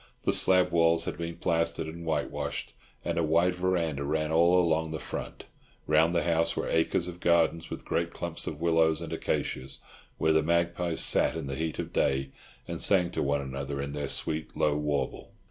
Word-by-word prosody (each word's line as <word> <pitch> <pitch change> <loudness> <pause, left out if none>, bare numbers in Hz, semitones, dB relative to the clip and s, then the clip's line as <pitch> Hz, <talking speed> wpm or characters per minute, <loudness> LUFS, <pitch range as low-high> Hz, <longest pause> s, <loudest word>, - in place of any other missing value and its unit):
The - - +1
slab 90 -1 +4
walls 85 -1 +3
had - - -3
been 85 0 -5
plastered 85 -1 0
and 85 +2 -8
whitewashed, 80 -1 -3 0.3
and - - -1
a - - +1
wide 85 +3 +3
verandah 90 -5 -1
ran 75 +2 -1
all 85 +3 +4
along 80 -2 +1
the 80 - -4
front. - - -7 0.4
Round 80 +3 +3
the 85 - +2
house 85 -1 +1
were - - -1
acres 80 +1 +1
of 90 0 -8
garden, 85 -1 +2
with - - -7
great 85 0 -1
clumps 85 -1 -5
of 75 - -5
willows 80 -1 +2
and 85 -1 -6
acacias, 65 -4 -3 0.4
where 80 - +2
the 80 - +4
magpies 85 +1 0
sat - - +3
in 80 -3 -4
the 70 - -4
heat 80 +3 -3
of - - -5
the - - +1
day 65 -1 0 0.4
and 85 -1 -3
sang 90 -3 +4
to - - -2
one 70 0 0
another 70 +1 -5
in 70 0 -3
their 70 0 -3
sweet, 80 0 -1
low 75 - +2
warble. 75 -1 -2
80 Hz, 195 wpm, -28 LUFS, 75-85 Hz, 0.4 s, slab